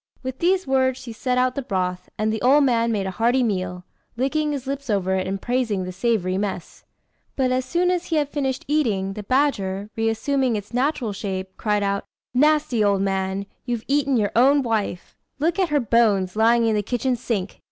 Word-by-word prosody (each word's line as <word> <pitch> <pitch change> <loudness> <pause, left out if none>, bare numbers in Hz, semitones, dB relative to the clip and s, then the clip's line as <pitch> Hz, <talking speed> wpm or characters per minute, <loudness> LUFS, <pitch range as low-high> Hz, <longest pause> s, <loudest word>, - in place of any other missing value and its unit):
With 260 0 -5
these 370 +2 +2
words 260 -1 +2
she 235 -3 -8
set 250 +2 -1
out 255 0 +2
the 275 - -3
broth, 185 -5 -3
and 215 0 0
the 220 - -3
old 280 +4 +5
man 235 -3 +2
made 200 -3 -1
a 190 - -2
hearty 240 +6 +2
meal, 185 -4 -2 0.3
licking 300 +4 0
his 280 -3 -4
lips 275 -1 -5
over 190 -3 +1
it, 185 0 -1
and 195 +1 -2
praising 240 -4 -1
the 185 - -5
savoury 185 -2 0
mess. 195 -4 -5 0.5
But 260 -2 +1
as 255 0 0
soon 350 +6 +1
as 360 -1 -1
he 330 - -2
had 295 -2 +2
finished 270 -3 -2
eating, 215 -11 0
the 210 - -6
badger, 205 -5 0
reassuming 230 +3 0
its 205 +2 -6
natural 250 -4 0
shape, 190 -2 -5
cried 210 -1 0
out 200 0 -1 0.3
"Nasty 295 -4 +3
old 200 -1 +2
man! 195 0 -1 0.2
you've 240 -2 -3
eaten 280 -2 +2
your 205 -2 +1
own 275 +4 +5
wife. 215 -6 -2 0.2
Look 330 +6 0
at 370 -3 +2
her 295 -1 +2
bones, 210 -6 +2
lying 230 +2 +4
in 225 - +2
the 210 - +1
kitchen 245 +4 -1
sink!" 215 -5 -3
230 Hz, 200 wpm, -23 LUFS, 200-265 Hz, 0.5 s, old